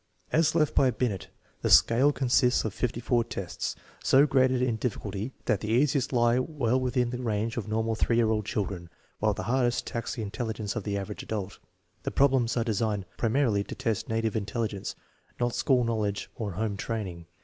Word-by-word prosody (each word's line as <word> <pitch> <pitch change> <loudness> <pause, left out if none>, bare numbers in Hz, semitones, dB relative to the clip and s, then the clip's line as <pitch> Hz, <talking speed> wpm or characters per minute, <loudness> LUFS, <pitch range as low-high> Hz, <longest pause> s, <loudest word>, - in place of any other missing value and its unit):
As 160 0 +3
left 155 -3 +2
by 135 - +4
JJineft 110 -9 -2 0.3
the - - 0
scale 130 +5 +6
consists 125 -3 +2
of 110 - -2
5 125 +2 -1 0.2
i 120 - +5
tests, 100 -6 -4 0.3
so 135 +2 +6
graded 130 -3 +3
in 125 -3 +1
difficulty 105 -1 -3
thai 105 - +2
the. 105 - -6
easiest 130 +4 +2
lie 120 -1 +3
well 130 -3 0
within 125 -1 0
the 125 0 -4
range 115 -1 -1
of 110 -4 -3
normal 110 +1 0
^ 115 - +1
year 115 -2 +3
old 110 -1 0
children, 95 -5 -3 0.3
while 105 -1 +1
the 95 - -4
hardest 120 +2 0
lax 115 - -3
the 115 - -4
intelligence 110 0 -4
of 110 - -4
the 100 -1 -1
average 100 +1 -5
adult. 100 -3 -5 0.4
The - - -2
problems 130 -4 +2
are 115 - +1
(Unsigned 105 -3 0
primarily 115 -3 +2
to - - -8
test 110 -2 -2
native 110 -1 0
intelligence, 105 -1 -3 0.4
not 120 -1 0
school 130 -3 +2
knowledge 110 -3 -2
or 105 -4 -4
home 105 +2 -2
training. 95 -7 -4
115 Hz, 185 wpm, -28 LUFS, 105-125 Hz, 0.4 s, scale